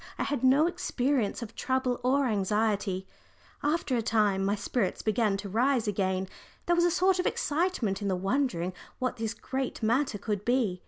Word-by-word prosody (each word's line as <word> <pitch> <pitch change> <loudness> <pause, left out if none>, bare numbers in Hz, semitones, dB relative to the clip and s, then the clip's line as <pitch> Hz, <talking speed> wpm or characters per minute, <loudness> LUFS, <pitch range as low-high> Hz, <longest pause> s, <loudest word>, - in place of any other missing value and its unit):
I - - -1
had 285 -1 -2
no 270 +4 +5
experience 275 - 0
of 225 - -9
trouble 260 -2 -1
or 270 +2 +3
anxiety. 205 -3 0 0.6
After 295 -3 0
a 235 - +1
time 210 -4 +2
my 200 +1 +1
spirits 205 0 -2
began 215 -2 +1
to 200 - -6
rise 235 +3 +1
again 190 -2 0 0.4
there 345 - +3
was 345 0 +3
a - - +4
sort 370 +2 +2
of 360 - +1
excitement 290 - 0
in 200 - -2
the 190 - +1
wondering 190 -3 0 0.2
what 255 -1 -2
this 225 0 -3
great 260 0 -4
matter 235 +1 +1
could 205 -1 -3
be. 235 -7 +1
230 Hz, 175 wpm, -29 LUFS, 200-270 Hz, 0.6 s, no